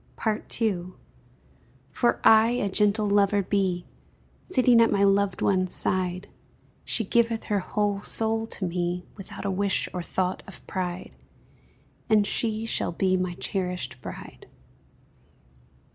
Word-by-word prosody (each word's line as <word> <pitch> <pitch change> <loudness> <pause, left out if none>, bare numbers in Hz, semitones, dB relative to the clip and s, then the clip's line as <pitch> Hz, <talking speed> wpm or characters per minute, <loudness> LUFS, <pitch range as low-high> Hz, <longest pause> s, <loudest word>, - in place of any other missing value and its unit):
II. 185 -5 -1 1.0
For 240 +11 +1
I 220 +1 +7
a 205 -5 -1
gentle 210 +1 +2
lover 200 0 +3
be, 185 -2 0 0.6
Sitting 250 -8 +4
at 230 - +4
my 200 0 +2
loved 200 -1 +2
one's 185 -2 +1
side; 185 0 -1 0.6
She 225 - +1
giveth 230 +2 +1
her 205 -1 0
whole 205 +1 -1
soul 225 +1 -1
to 200 - -5
me 175 0 -2
Without 195 0 -9
a 195 - 0
wish 195 +1 0
or 180 - -3
thought 185 +1 -2
of 195 - -10
pride, 180 -1 -4 0.9
And 215 -2 +4
she 220 +1 -1
shall 225 - -1
be 185 +2 +1
my 180 -1 -2
cherished 180 -11 -3
bride. - - -10
195 Hz, 130 wpm, -26 LUFS, 185-215 Hz, 1.0 s, I